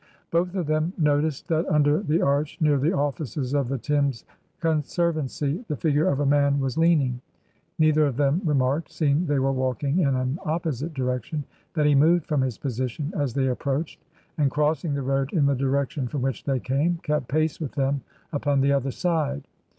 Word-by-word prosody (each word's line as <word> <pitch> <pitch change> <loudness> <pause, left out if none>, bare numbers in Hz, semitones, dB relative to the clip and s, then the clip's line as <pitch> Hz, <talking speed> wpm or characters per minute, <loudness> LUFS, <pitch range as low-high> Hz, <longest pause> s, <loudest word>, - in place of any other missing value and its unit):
Both 175 +3 0
of 180 -3 -1
them 155 +3 0
noticed 150 -2 +1
that 165 0 +1
under 150 +2 +3
the 165 -4 +1
arch 140 +2 0
near 150 -3 +3
the 150 +5 +2
offices 140 - -2
of 140 -3 +1
the 135 - -1
Thames 140 -2 -1 0.3
Conservancy 155 - -1
the 150 - -2
figure 150 0 +1
of 140 - +1
a 145 - +1
man 140 0 +3
was 135 -1 -1
leaning. 150 -7 +2 0.6
Neither 155 -2 +4
of 130 -3 -3
them 145 +5 +2
remarked, 145 0 +1
seeing 155 +1 +1
they 145 -1 +1
were 135 0 +2
walking 135 +4 0
in 140 -6 +2
an 130 +5 -1
opposite 160 -1 -2
direction, 130 +3 -2 0.3
that 150 -2 +2
he 150 - +4
moved 160 +4 +4
from 150 -3 0
his 130 -4 -2
position 130 - -3
as 140 -8 -1
they 135 -1 +2
approached, 140 +5 -3 0.4
and, 145 -2 +3
crossing 150 +1 0
the 140 - -2
road 135 +1 -1
in 155 -6 +3
the 140 - +3
direction 135 +1 -1
from 135 0 -3
which 135 -4 -2
they 135 -2 0
came, 145 +8 0
kept 150 -4 -1
pace 155 +1 0
with 150 - -4
them 140 -1 0 0.3
upon 145 -1 +1
the 140 +1 +3
other 140 -1 +1
side. 145 -2 -1
145 Hz, 190 wpm, -25 LUFS, 135-155 Hz, 0.6 s, Neither